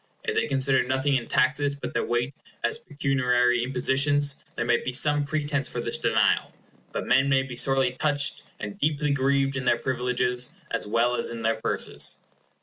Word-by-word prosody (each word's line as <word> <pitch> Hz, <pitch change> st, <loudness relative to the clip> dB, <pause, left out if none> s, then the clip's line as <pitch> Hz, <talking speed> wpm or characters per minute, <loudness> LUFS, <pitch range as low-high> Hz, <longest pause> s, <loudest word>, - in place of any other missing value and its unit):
If 455 Hz, -, -2 dB
they 445 Hz, -, 0 dB
consider 135 Hz, 0 st, +2 dB
nothing 130 Hz, +2 st, 0 dB
in 120 Hz, -3 st, -2 dB
taxes 140 Hz, +1 st, +1 dB
but 140 Hz, -, -7 dB
their -, -, 0 dB
weight 120 Hz, +3 st, -1 dB, 0.3 s
as 120 Hz, -, 0 dB
pecuniary 125 Hz, -4 st, +1 dB
impositions, 140 Hz, +3 st, +1 dB
there 120 Hz, -, -2 dB
might 120 Hz, 0 st, +1 dB
be 125 Hz, -, -2 dB
some 145 Hz, +3 st, +3 dB
pretence 145 Hz, -2 st, -2 dB
for -, -, -5 dB
this -, -, -1 dB
denial; -, -, +2 dB, 0.4 s
but -, -, -4 dB
men 135 Hz, +1 st, +3 dB
may 135 Hz, -1 st, +3 dB
be 130 Hz, -2 st, -8 dB
sorely 135 Hz, 0 st, +3 dB
touched 145 Hz, +2 st, -1 dB, 0.2 s
and 105 Hz, -1 st, -7 dB
deeply 150 Hz, 0 st, 0 dB
grieved 135 Hz, 0 st, +1 dB
in 130 Hz, -1 st, -3 dB
their 120 Hz, -, +3 dB
privileges, 125 Hz, 0 st, -1 dB, 0.2 s
as 115 Hz, -2 st, -2 dB
well 115 Hz, +3 st, +1 dB
as -, -, 0 dB
in 115 Hz, -1 st, -6 dB
their 110 Hz, 0 st, 0 dB
purses. -, -, +2 dB
135 Hz, 180 wpm, -25 LUFS, 125-140 Hz, 0.4 s, some